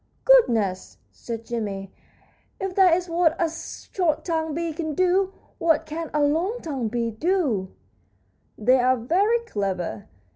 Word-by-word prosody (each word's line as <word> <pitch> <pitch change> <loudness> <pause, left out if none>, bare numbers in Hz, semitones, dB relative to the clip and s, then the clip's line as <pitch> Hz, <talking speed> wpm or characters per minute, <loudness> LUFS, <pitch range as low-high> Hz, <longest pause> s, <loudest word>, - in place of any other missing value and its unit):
"Goodness!" 230 - +3
said 230 -1 -7
Jimmie, 200 -5 -4 0.7
"if 385 -1 -3
that 365 -3 +5
is 365 0 -5
what 335 -1 +2
a 335 - +2
short 320 0 -3
tongued 320 -3 -1
bee 335 -1 -2
can 315 -2 -4
do, 370 +2 +2 0.3
what 330 -3 +2
can 320 +1 -5
a 300 -1 +1
long 335 +10 +1
tongued 270 - -3
bee 230 0 -1
do?" 250 - 0 0.9
"They 250 +4 +4
are 255 +1 +3
very 390 - +2
clever. 190 - -3
315 Hz, 140 wpm, -24 LUFS, 230-355 Hz, 0.9 s, that